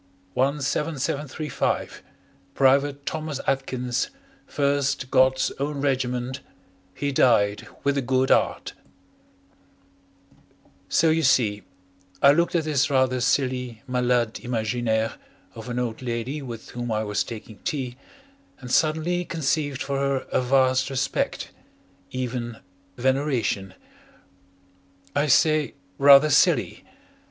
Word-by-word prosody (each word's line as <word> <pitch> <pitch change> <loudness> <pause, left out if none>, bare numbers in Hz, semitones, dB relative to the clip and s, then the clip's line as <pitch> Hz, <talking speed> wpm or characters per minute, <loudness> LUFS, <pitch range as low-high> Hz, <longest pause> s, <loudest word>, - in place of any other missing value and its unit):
17735 145 - -2 0.5
P'V'TE 140 +1 +2
THOMAS 155 -3 -4
ATKINS 130 - -1 0.4
1ST 140 -2 0
GOD'S 130 0 +3
OWN 145 +1 -2
REG'T 130 -1 -1 0.6
HE 145 0 -2
DIED 105 -6 +2 0.2
WITH 140 0 +1
A - - -1
GOOD 130 +1 +1
'EART - - +1 2.2
So, 160 - +3
you 160 +1 +2
see, 110 -7 +2 0.6
I 140 - +7
looked 170 +4 +1
at 165 - +2
this 145 -2 +1
rather 130 -2 +2
silly 125 -3 -1
malade 125 -2 0
imaginaire 115 -1 -1 0.4
of 115 +3 -9
an 120 - -3
old 120 -2 -3
lady 125 +4 -3
with 120 -4 -8
whom 120 -1 -4
I 110 0 0
was 105 -1 -1
taking 110 -2 -9
tea, 135 -7 -3 0.6
and 125 -2 -8
suddenly 160 +4 +1
conceived 145 -4 -1
for 140 -1 -2
her 140 -1 0
a - - +2
vast 130 0 +2
respect 135 +1 -2 0.6
even 125 -2 -4 0.4
veneration. 125 -7 0 1.4
I 145 +1 +2
say 155 +2 +3 0.2
"rather 140 +2 +7
silly." - - +2
130 Hz, 110 wpm, -24 LUFS, 125-145 Hz, 2.2 s, I